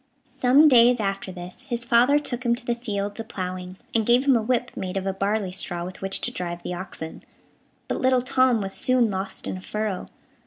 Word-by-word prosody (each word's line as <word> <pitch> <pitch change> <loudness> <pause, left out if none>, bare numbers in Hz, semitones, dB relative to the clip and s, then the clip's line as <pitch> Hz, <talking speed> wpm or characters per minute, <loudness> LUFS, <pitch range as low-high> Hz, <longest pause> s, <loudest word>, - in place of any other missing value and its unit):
Some 270 +5 +4
days 245 -3 +6
after 195 -2 -2
this, 180 +8 -9
his 240 -2 -3
father 240 +4 +5
took 250 -4 -3
him 235 -1 +2
to 240 0 -8
the 240 - +1
fields 205 -3 -4
a - - -2
ploughing, 185 -3 -5 0.2
and 225 - +2
gave 240 +4 +3
him 275 -2 +5
a 230 - +2
whip, 245 +2 0
made 185 +1 -4
of 190 - -2
a 195 - 0
barley 200 0 -1
straw, 175 -2 -2
with 180 0 -9
which 195 0 -1
to - - -1
drive 175 -1 -5
the - - -4
oxen; 175 -3 -7 0.6
but - - -2
little 255 -1 +3
Tom 255 -3 +3
was 195 -1 -4
soon 250 -4 +2
lost 190 0 -4
in - - -3
a - - -9
furrow. 210 -1 -3
215 Hz, 220 wpm, -24 LUFS, 190-245 Hz, 0.6 s, days